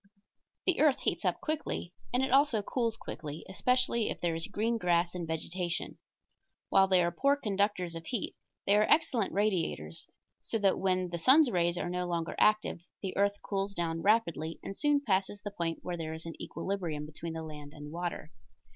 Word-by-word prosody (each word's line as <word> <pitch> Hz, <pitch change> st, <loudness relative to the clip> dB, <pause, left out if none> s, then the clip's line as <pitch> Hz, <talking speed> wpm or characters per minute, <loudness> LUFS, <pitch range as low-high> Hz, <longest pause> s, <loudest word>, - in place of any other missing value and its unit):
The 370 Hz, -, +2 dB
earth 290 Hz, -2 st, +4 dB
heats -, -, 0 dB
up -, -, +1 dB
quickly, 305 Hz, -, -3 dB, 0.2 s
and 250 Hz, +2 st, +2 dB
it 265 Hz, -, 0 dB
also 270 Hz, -6 st, +4 dB
cools 230 Hz, 0 st, -1 dB
quickly, 150 Hz, 0 st, -7 dB
especially 235 Hz, +3 st, +1 dB
if -, -, -4 dB
there 170 Hz, -1 st, 0 dB
is 165 Hz, 0 st, -3 dB
green 225 Hz, +3 st, 0 dB
grass 175 Hz, -2 st, +2 dB
and 175 Hz, -2 st, -4 dB
vegetation. 170 Hz, +2 st, -3 dB, 0.7 s
While 190 Hz, 0 st, +5 dB
they 185 Hz, -2 st, +4 dB
are 170 Hz, -, +1 dB
poor 280 Hz, +11 st, +3 dB
conductors 200 Hz, -7 st, 0 dB
of 165 Hz, 0 st, -8 dB
heat, 240 Hz, -6 st, -2 dB, 0.3 s
they 200 Hz, -, +4 dB
are 210 Hz, -, +3 dB
excellent 235 Hz, -9 st, +3 dB
radiators, 175 Hz, -, -1 dB, 0.3 s
so -, -, -2 dB
that 200 Hz, -3 st, +2 dB
when 185 Hz, -1 st, +1 dB
the 170 Hz, 0 st, -4 dB
sun's 265 Hz, -, +6 dB
rays 175 Hz, -1 st, +1 dB
are -, -, -2 dB
no 180 Hz, 0 st, -1 dB
longer 170 Hz, -1 st, -2 dB
active 215 Hz, -5 st, +3 dB, 0.2 s
the 190 Hz, -, -3 dB
earth 200 Hz, +1 st, +1 dB
cools 200 Hz, 0 st, -2 dB
down 165 Hz, -1 st, -1 dB
rapidly 170 Hz, -7 st, +1 dB
and 195 Hz, -, -5 dB
soon 295 Hz, +2 st, +3 dB
passes 195 Hz, -1 st, +1 dB
the 205 Hz, -, -4 dB
point 170 Hz, -4 st, -3 dB
where 175 Hz, -1 st, -3 dB
there 160 Hz, -1 st, -4 dB
is 160 Hz, +1 st, -6 dB
an 165 Hz, -, -5 dB
equilibrium 170 Hz, -7 st, -3 dB
between 160 Hz, +2 st, -6 dB
the 160 Hz, 0 st, -5 dB
land 150 Hz, -2 st, -8 dB
and 150 Hz, 0 st, -9 dB
water. 175 Hz, +1 st, -4 dB
185 Hz, 190 wpm, -31 LUFS, 165-215 Hz, 0.7 s, sun's